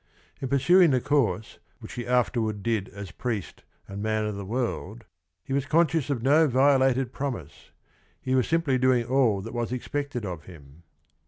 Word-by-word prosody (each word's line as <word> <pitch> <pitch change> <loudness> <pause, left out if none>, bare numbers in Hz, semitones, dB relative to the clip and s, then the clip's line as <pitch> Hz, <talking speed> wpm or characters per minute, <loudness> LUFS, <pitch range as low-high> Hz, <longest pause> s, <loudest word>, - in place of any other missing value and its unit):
In 135 - -2
pursuing 170 +7 +5
the 130 -2 +3
course 120 -8 0 0.2
which - - -11
he 120 -1 -5
afterward 115 -4 0
did 110 -4 -1
as 100 -3 -9
priest 110 0 -4 0.3
and 100 +1 -7
man 110 0 0
of 105 - -2
the 100 - -6
world 120 - -3 0.4
he 135 - -5
was 140 0 0
conscious 160 -2 +2
of 125 -5 -2
no 150 +4 +5
vio 135 +1 +4
lated 130 -1 +1
promise: 125 - -6 0.5
he 130 - -2
was 130 -2 +2
simply 160 -6 +1
doing 125 -2 +3
all 120 -6 +2
that 115 +4 -8
was 120 -1 -2
expected 125 -1 -3
of 90 -4 -6
him. 75 -3 -15
125 Hz, 175 wpm, -26 LUFS, 105-135 Hz, 0.5 s, pursuing